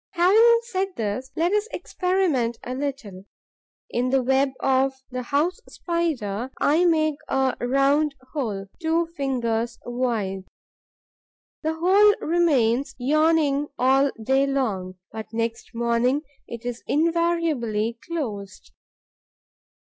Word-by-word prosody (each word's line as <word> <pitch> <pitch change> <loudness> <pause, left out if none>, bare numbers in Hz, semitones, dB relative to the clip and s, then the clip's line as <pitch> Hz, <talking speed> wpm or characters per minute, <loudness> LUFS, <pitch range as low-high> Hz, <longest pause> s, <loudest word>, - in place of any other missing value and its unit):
Having 435 +7 +5
said 385 -4 -3
this, 225 +4 -3
let 340 +4 +1
us 420 +1 +1
experiment 360 - 0
a 250 - -4
little. 255 -9 -5 0.7
In 245 +1 0
the 265 0 +2
web 265 +2 +2
of 265 0 +2 0.2
the 255 0 -3
House 295 - 0
Spider, 265 - -2
I 320 +5 +3
make 310 -3 +2
a 265 -1 +1
round 275 +4 +2 0.2
hole, 215 -10 -3 0.2
two 330 +1 +1
fingers 235 -5 -1
wide. 225 -6 -2 1.2
The 315 0 -1
hole 395 +5 +5
remains 280 -7 +1
yawning 295 +1 +2
all 270 +3 +4
day 270 +4 +2
long; 205 -10 -2 0.2
but 220 0 -7
next 230 0 -3
morning 235 +4 +1 0.2
it 235 0 -8
is 245 -1 -4
invariably 310 -9 0
closed. 210 - -5
270 Hz, 110 wpm, -24 LUFS, 235-325 Hz, 1.2 s, Having